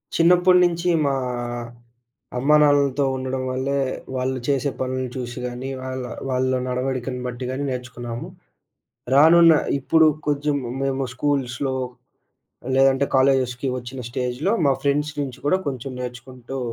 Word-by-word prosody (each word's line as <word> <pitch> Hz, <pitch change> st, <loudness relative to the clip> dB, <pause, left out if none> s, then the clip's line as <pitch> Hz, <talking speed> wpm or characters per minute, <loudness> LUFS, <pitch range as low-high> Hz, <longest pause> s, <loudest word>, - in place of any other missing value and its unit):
చిన్నప్పుడ్నించి 180 Hz, 0 st, +4 dB, 0.2 s
మా 140 Hz, -, +2 dB, 1.2 s
అమ్మా 145 Hz, +4 st, +4 dB
నాన్నలతో 145 Hz, -1 st, +3 dB
ఉండడం 130 Hz, 0 st, -3 dB
వల్లే, 130 Hz, +2 st, -1 dB, 0.4 s
వాళ్ళు 130 Hz, 0 st, -1 dB
చేసే 140 Hz, -1 st, +1 dB
పనుల్ని 130 Hz, 0 st, -2 dB
చూషి 120 Hz, -2 st, -5 dB
గాని, 125 Hz, +2 st, -5 dB
వాళ్ళ 130 Hz, 0 st, -4 dB, 0.3 s
వాళ్ళ 130 Hz, 0 st, +1 dB
నడవడికను 125 Hz, 0 st, -2 dB
బట్టి 125 Hz, +1 st, -5 dB
గాని 135 Hz, +2 st, -3 dB
నేర్చుకున్నాము. 120 Hz, -2 st, -6 dB, 0.9 s
రానున్న 165 Hz, +3 st, +7 dB, 0.3 s
ఇప్పుడు 160 Hz, +4 st, +4 dB, 0.2 s
కొంచెం 145 Hz, 0 st, +1 dB, 0.3 s
మేము 135 Hz, 0 st, -1 dB
స్కూల్స్‌లో 135 Hz, -1 st, -1 dB, 1.0 s
లేదంటే, 135 Hz, +1 st, +4 dB
కాలేజెస్‌కి 130 Hz, -1 st, +2 dB
వచ్చిన 125 Hz, +1 st, -8 dB
స్టేజ్‌లో 130 Hz, -, -1 dB
మా 140 Hz, -, +4 dB
ఫ్రెండ్స్ 145 Hz, +1 st, +1 dB
నుంచి 135 Hz, -4 st, -4 dB
కూడా 185 Hz, +6 st, +3 dB
కొంచెం 130 Hz, 0 st, -5 dB
నేర్చుకుంటూ 125 Hz, +1 st, -7 dB
130 Hz, 115 wpm, -22 LUFS, 125-145 Hz, 1.2 s, రానున్న